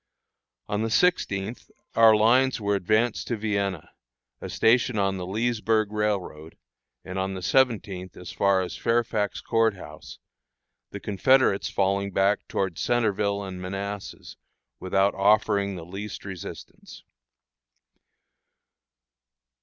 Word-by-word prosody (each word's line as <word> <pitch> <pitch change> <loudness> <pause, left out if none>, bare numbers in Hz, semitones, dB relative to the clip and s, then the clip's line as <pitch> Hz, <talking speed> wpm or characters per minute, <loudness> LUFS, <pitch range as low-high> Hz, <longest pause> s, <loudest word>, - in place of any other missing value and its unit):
On 105 +1 -2
the 115 - -1
sixteenth 110 - 0 0.2
our 115 -1 +6
lines 125 +5 +3
were 100 -1 0
advanced 110 +5 0
to 120 - -2
Vienna, 100 -5 -2 0.5
a - - -6
station 115 0 +2
on 95 -1 0
the 90 -1 -5
Leesburg 110 0 0
Railroad, 100 -7 -3 0.5
and 95 +1 -5
on 95 0 -2
the 95 - -7
seventeenth 105 -5 0
as 90 -2 -8
far 100 -1 +2
as 90 - -6
Fairfax 115 -3 -1
Court 115 -2 +1
House, 95 - -11 0.7
the - - -7
Confederates 105 +1 +2
falling 100 0 0
back 95 +2 +1
toward 95 -4 -2
Centreville 105 -4 0
and 95 -2 -7
Manassas 100 +2 -6 0.4
without 95 +2 +1
offering 100 -1 +2
the 85 -2 -8
least 100 +5 -7
resistance. 95 -3 -9
100 Hz, 115 wpm, -25 LUFS, 95-110 Hz, 0.7 s, our